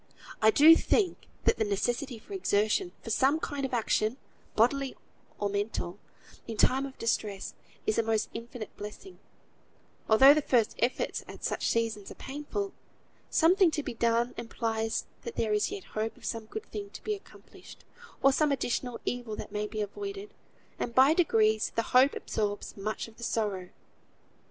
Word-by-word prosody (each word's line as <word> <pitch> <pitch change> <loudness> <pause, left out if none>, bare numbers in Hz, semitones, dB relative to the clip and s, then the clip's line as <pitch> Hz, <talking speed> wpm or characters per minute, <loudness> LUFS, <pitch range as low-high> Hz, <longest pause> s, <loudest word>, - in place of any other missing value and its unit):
I 220 - +7
do 305 +8 +8
think 380 +2 +1 0.2
that - - +3
the 220 - +2
necessity 235 +5 -1
for 235 - -12
exertion, 210 - +1
for 225 - -5
some 275 +7 +3
kind 285 -3 -4
of - - -16
action 225 0 +1 0.4
(bodily 265 +4 +2 0.4
or 205 - 0
mental) 200 -2 -3 0.5
in 225 - -5
time 265 +5 +3
of 265 - -13
distress, 210 -4 -2 0.3
is 215 - +1
a - - +6
most 225 -1 0
infinite 230 -1 -7
blessing, 210 - -9 0.9
although 265 +6 +9
the 305 - +1
first 240 -6 +2
efforts 245 +3 0
at - - -11
such - - 0
seasons 225 -3 -1
are - - -9
painful. 295 +9 -4 0.6
Something 360 +2 +5
to 305 -2 -2
be 255 - -4
done 235 +1 +1
implies 225 -1 -2 0.2
that 465 - -7
there 215 -2 0
is 210 - +2
yet 405 -2 -6
hope 220 +1 -4
of - - -13
some 225 -1 -3
good 435 - -6
thing 405 -1 -5
to - - -10
be 425 - -1
accomplished, 405 - -13 0.4
or 275 - +6
some 300 +1 +2
additional 250 -2 -1
evil 245 -3 -3
that - - -7
may 210 0 -2
be 215 0 -4
avoided; 395 - -5 0.5
and 235 - -3
by 270 +4 +7
degrees 220 -10 +2
the 230 - +1
hope 260 +3 +6
absorbs 205 -1 -3
much 215 +3 -3
of 225 - -17
the 235 - -9
sorrow. 205 -6 -1
235 Hz, 170 wpm, -29 LUFS, 215-285 Hz, 0.9 s, although